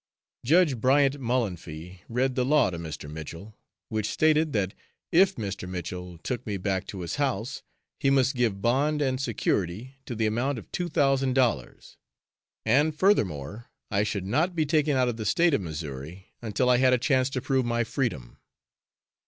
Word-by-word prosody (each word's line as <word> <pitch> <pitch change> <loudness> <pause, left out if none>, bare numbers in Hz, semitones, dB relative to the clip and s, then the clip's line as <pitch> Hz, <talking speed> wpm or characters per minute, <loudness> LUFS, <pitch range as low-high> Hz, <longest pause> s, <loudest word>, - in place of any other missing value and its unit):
Judge 155 0 +4
Bryant 140 +1 +3
Mullanphy 90 - -3
read 130 +3 +1
the 125 - +1
law 135 -5 +3
to 85 - -5
Mr. 80 -3 -7
Mitchell, 80 +7 -8 0.3
which 110 -1 -1
stated 155 +5 +2
that 100 -5 -1 0.4
if 185 +3 +5
Mr. 100 -4 -5
Mitchell 90 0 -6
took 120 +8 -4
me 105 -2 -2
back 95 0 -2
to 95 - -6
his 85 - -4
house, 130 -2 -1 0.4
he 140 - +2
must 135 -1 +3
give 110 -5 0
bond 145 +6 +2
and 130 -2 0
security 115 0 -2
to 120 - -4
the 110 0 0
amount 120 +5 0
of 110 - -10
two 175 -1 -2
thousand 135 -3 +2
dollars, 120 - -1 0.7
and 145 +7 +3
furthermore, 110 - +1 0.2
I 100 0 +2
should 100 -2 -2
not 155 - +1
be 160 -2 +1
taken 150 -2 +2
out 130 -1 +3
of 120 -2 -2
the 110 - -4
State 170 +5 +3
of 125 - +2
Missouri 80 +2 -7
until 120 +3 0
I 125 -1 +5
had 130 0 +4
a - - +5
chance 130 +1 +2
to 135 - -2
prove 130 0 +1
my 120 0 +1
freedom. 110 - -3
120 Hz, 175 wpm, -27 LUFS, 95-135 Hz, 0.7 s, if